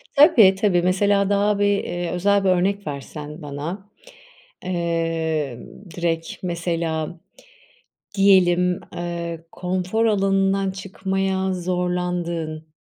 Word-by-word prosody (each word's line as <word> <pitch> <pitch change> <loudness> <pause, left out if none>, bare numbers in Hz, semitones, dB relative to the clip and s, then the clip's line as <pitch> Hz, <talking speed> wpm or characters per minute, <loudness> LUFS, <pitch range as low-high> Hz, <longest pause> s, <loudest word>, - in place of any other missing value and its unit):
Tabii, 270 - +7
tabii, 190 -3 +2
mesela, 200 +2 +2
daha 205 0 +2
bir, 205 - +3 0.2
eee, 175 -1 -3
özel 200 +3 +2
bir 190 - +3
örnek 195 +2 +1
versen 150 +2 -7
bana. 155 +8 -6 0.7
Eee, 165 -6 -1 0.4
direkt 165 -1 -3
mesela, 170 -2 -2 1.0
diyelim, 180 -2 +4 0.2
eee, 170 -1 -4
konfor 185 +5 -1
alanından 195 -2 +2
çıkmaya 190 0 -2
zorlandığın, 180 -3 -2
180 Hz, 95 wpm, -22 LUFS, 170-195 Hz, 1.0 s, Tabii